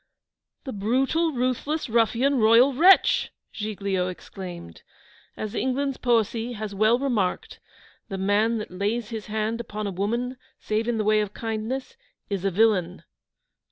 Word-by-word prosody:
'The 265 Hz, -, -6 dB
brutal 265 Hz, +11 st, +1 dB
ruthless 255 Hz, +4 st, -1 dB
ruffian 235 Hz, +4 st, +2 dB
royal 230 Hz, +5 st, +6 dB
wretch!' 360 Hz, +8 st, +5 dB, 0.2 s
Giglio 200 Hz, -4 st, -2 dB
exclaimed. 180 Hz, -, -8 dB, 0.6 s
'As 215 Hz, -1 st, -5 dB
England's 265 Hz, +2 st, -1 dB
poesy 235 Hz, 0 st, 0 dB
has 215 Hz, -2 st, -5 dB
well 215 Hz, +4 st, +3 dB
remarked, 235 Hz, -9 st, -1 dB, 0.5 s
"The 195 Hz, -, -4 dB
man 205 Hz, +4 st, +2 dB
that 215 Hz, -, -6 dB
lays 210 Hz, +5 st, -2 dB
his 220 Hz, -4 st, -6 dB
hand 220 Hz, +2 st, -2 dB
upon 215 Hz, -2 st, -5 dB
a 200 Hz, -, -2 dB
woman, 235 Hz, +7 st, -2 dB, 0.2 s
save 215 Hz, +2 st, -1 dB
in 240 Hz, -1 st, 0 dB
the 215 Hz, -, 0 dB
way 215 Hz, 0 st, +3 dB
of 210 Hz, -1 st, -3 dB
kindness, 230 Hz, -, -4 dB, 0.3 s
is 195 Hz, -2 st, -2 dB
a 195 Hz, -, +2 dB
villain." 190 Hz, -3 st, +1 dB
220 Hz, 140 wpm, -25 LUFS, 205-245 Hz, 0.6 s, royal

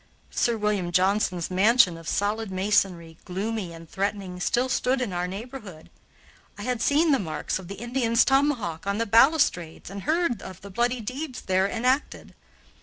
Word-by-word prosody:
Sir 235 Hz, -1 st, +1 dB
William 205 Hz, -4 st, -1 dB
Johnson's 185 Hz, -1 st, +1 dB
mansion 200 Hz, 0 st, +4 dB
of 165 Hz, -1 st, -11 dB
solid 210 Hz, +1 st, -1 dB
masonry, 185 Hz, -4 st, 0 dB
gloomy 195 Hz, 0 st, -3 dB
and 165 Hz, 0 st, -11 dB
threatening, 195 Hz, -1 st, -3 dB
still 245 Hz, +7 st, +1 dB
stood 260 Hz, 0 st, +1 dB
in 240 Hz, -7 st, -2 dB
our 175 Hz, 0 st, -1 dB
neighborhood. 200 Hz, -4 st, -9 dB, 0.7 s
I -, -, -7 dB
had 250 Hz, -2 st, -2 dB
seen 305 Hz, +5 st, +3 dB
the 275 Hz, -, +3 dB
marks 170 Hz, 0 st, -3 dB
of 185 Hz, -, -10 dB
the 200 Hz, -, -6 dB
Indian's 235 Hz, +1 st, +1 dB
tomahawk 270 Hz, -, +1 dB
on 200 Hz, 0 st, 0 dB
the 230 Hz, -, 0 dB
balustrades 230 Hz, -, +3 dB
and 200 Hz, 0 st, -6 dB
heard 315 Hz, -, 0 dB
of 185 Hz, -2 st, -10 dB
the 200 Hz, -, -10 dB
bloody 240 Hz, +4 st, 0 dB
deeds 255 Hz, +4 st, -5 dB
there 190 Hz, +1 st, +1 dB
enacted. 255 Hz, +6 st, -1 dB
210 Hz, 165 wpm, -25 LUFS, 185-245 Hz, 0.7 s, mansion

